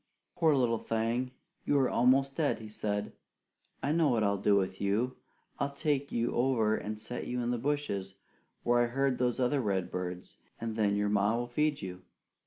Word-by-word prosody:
"Poor 160 -3 +4
little 120 -4 +2
thing, 115 +3 -1 0.3
you 145 - +2
are 135 -2 +4
almost 135 +3 +3
dead," 155 -4 +1
he 110 -1 -9
said. 105 -1 -3 0.7
"I 145 - +1
know 160 -1 +3
what 115 -4 +2
I'll 100 -1 +1
do 100 +1 +4
with 95 -1 0
you. 110 +6 +1 0.4
I'll 140 0 -1
take 145 -2 0
you 120 0 0
over 120 -4 +2
and 105 0 -4
set 120 +2 -6
you 125 - -2
in 120 0 0
the 120 - -1
bushes 115 -9 -2 0.5
where 120 0 +3
I - - +1
heard 135 +1 0
those 125 -1 +1
other 130 +2 +2
redbirds, 90 -3 -3 0.2
and 115 -1 -3
then 105 -2 +2
your 105 0 +1
ma 105 +2 +2
will 120 - -1
feed 145 +2 0
you." 90 -1 -6
120 Hz, 190 wpm, -31 LUFS, 105-135 Hz, 0.7 s, Poor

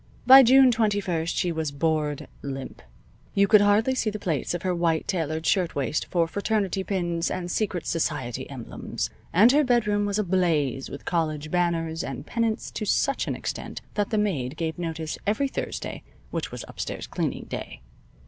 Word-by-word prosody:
By 265 +2 +11
June 260 +1 +7
twenty 215 -3 +2
first 170 -4 -2
she 175 - 0
was 160 -2 -2
bored 150 0 -1
limp. 135 -1 -6 0.5
You 200 0 +4
could 210 0 +7
hardly 205 +5 +3
see 235 -4 0
the 215 - -4
plaits 165 -5 -2
of 175 - -5
her 185 -1 +1
white 170 -2 0
tailored 160 -3 -2
shirtwaist 165 -7 0
for 170 -2 +1
fraternity 200 0 -1
pins 175 -4 -1
and 175 -1 -3
secret 185 -5 -1
society 135 -6 -2
emblems, 115 - -5 0.2
and 210 +8 +6
her 295 +2 +4
bedroom 210 -5 +2
was 200 0 -1
ablaze 170 - +1
with 140 - -9
college 155 -3 -1
banners 165 -2 0
and 135 +1 -6
pennants 230 +1 -1
to - - -4
such 275 +6 +1
an - - -1
extent - - -5
that 205 -1 0
the 215 - 0
maid 155 -10 -1
gave 160 +1 -3
notice 160 -2 -4
every 220 +7 +2
Thursday - - -5 0.3
which - - -3
was - - -6
upstairs - - -5
cleaning - - -3
day. - - -6
175 Hz, 170 wpm, -26 LUFS, 155-210 Hz, 0.5 s, By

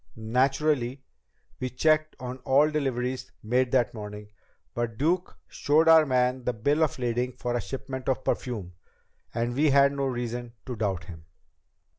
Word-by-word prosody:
Naturally, 130 +3 0 0.6
we 130 - -2
checked 155 +4 +2
on 125 0 -5
all 145 +4 +3
deliveries 130 -3 -2
made 125 +3 +1
that 125 -4 +2
morning, 105 -1 -8 0.4
but 120 -2 -3
Duke 170 +6 0
showed 155 +3 +2
our 160 -2 +7
man 125 0 +1
the 125 - 0
bill 140 +8 +1
of 155 - 0
lading 125 0 -1
for 120 0 -3
a 120 - 0
shipment 130 0 -5
of 130 0 0
perfume, 105 -8 -3 0.6
and 120 +1 -1
we 150 +4 +3
had 140 0 +5
no 140 -1 -1
reason 120 -1 -4
to 125 - -5
doubt 100 -5 -2
him." 85 -4 -11
125 Hz, 155 wpm, -27 LUFS, 120-140 Hz, 0.6 s, our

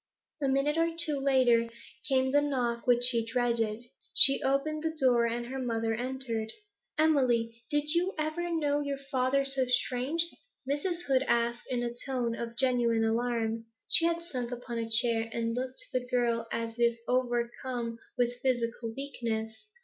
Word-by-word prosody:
A 275 - +1
minute 275 +4 +1
or 330 0 +2
two 310 -4 +2
later 255 -4 +3 0.4
came 260 -1 +2
the 290 +1 +4
knock 250 -5 -2
which 245 0 +3
she 240 -2 +3
dreaded. 230 -2 -1 0.3
She 275 0 +10
opened 275 +3 0
the 320 0 -3
door, 245 -3 +3
and 235 +1 -3
her 265 +2 -5
mother 230 -3 -1
entered. 240 -2 -3 0.5
'Emily, 245 -7 +1
did 295 0 0
you 360 +3 0
ever 310 +3 -2
know 295 -3 0
your 280 -1 -3
father 275 0 0
so 270 -1 +1
strange?' 255 +6 0 0.4
Mrs. 340 +5 -2
Hood 265 -4 +2
asked, 235 0 0
in 245 -1 -1
a 240 0 -3
tone 245 -2 -2
of 235 0 -6
genuine 240 -3 +2
alarm. 230 0 -1 0.2
She 335 - +7
had 335 0 0
sunk 250 -8 -5
upon 240 -1 -5
a 225 0 -4
chair, 225 0 +2
and 230 0 -2
looked 255 +1 -4
to 255 - -3
the 250 - -12
girl 235 -2 0
as 230 0 -4
if 235 -1 +2
overcome 240 -1 -2 0.2
with 245 0 -1
physical 235 -2 -1
weakness. 230 - -5
250 Hz, 165 wpm, -29 LUFS, 235-275 Hz, 0.5 s, She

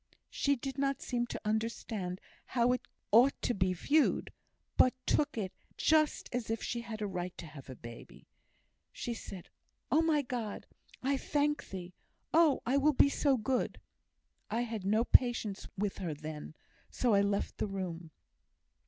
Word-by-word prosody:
She 280 0 +2
did 270 +1 -5
not 275 -1 +1
seem 240 -1 -1
to - - -5
understand 215 -4 -2 0.3
how 245 -1 +2
it 250 - +1 0.3
ought 245 +6 +6
to 245 - +2
be 185 -3 +1
viewed, 285 - +2 0.4
but 255 - +5
took 295 -4 +1
it 190 -4 -2 0.2
just 310 -1 +3
as 245 -3 -2
if 225 0 -1
she 235 - -2
had 220 -2 -5
a - - 0
right 180 -2 -4
to - - -7
have 145 -4 -11
a 130 - -6
baby. 120 0 -11 0.7
She 240 - -4
said, 195 -5 -8 0.4
'Oh, 315 - +5
my 310 -3 +3
God, 240 -5 -4 0.4
I 275 +1 +2
thank 295 +2 0
Thee! 180 -2 -7 0.4
Oh! 320 -3 +5
I 255 +4 +2
will 295 +2 +4
be 280 - +6
so 280 -1 +2
good!' 250 +3 -1 0.7
I 230 - 0
had 225 -5 -4
no 215 +3 +3
patience 240 -5 +3
with 205 0 -1
her 170 -6 -3
then, 155 0 -7 0.3
so 245 -3 +1
I 200 - +5
left 200 0 -1
the - - 0
room." 180 -4 -4
230 Hz, 165 wpm, -33 LUFS, 190-270 Hz, 0.7 s, ought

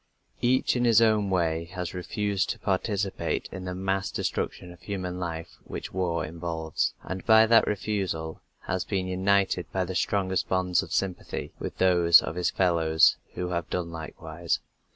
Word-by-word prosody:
Each 125 +2 +2
in 125 - +1
his 115 -3 +6
own 110 -3 +3
way 85 -3 0
has 90 -2 -4
refused 100 +2 -1
to - - -2
participate 100 0 -1
in 95 -1 -7
the 90 0 -4
mass 95 +1 -1
destruction 90 0 -3
of 90 - -18
human 90 -3 -4
life 80 -2 -5
which - - -7
war 85 -3 -1
involves, 80 -1 -2
and 95 -1 -5
by 110 -1 +7
that 115 0 +5
refusal 95 -6 -2 0.2
has 95 -1 -2
been 95 -3 -2
united 95 0 +1
by 95 -1 0
the 95 - -5
strongest 95 0 0
bonds 95 -1 +2
of - - -9
sympathy 95 -2 -3
with - - -5
those 90 -2 +6
of - - -4
his 90 +1 0
fellows 85 -3 +3 0.2
who 90 0 -3
have 85 -2 -2
done 85 -2 -2
likewise. 80 +1 -3
90 Hz, 165 wpm, -27 LUFS, 85-100 Hz, 0.2 s, by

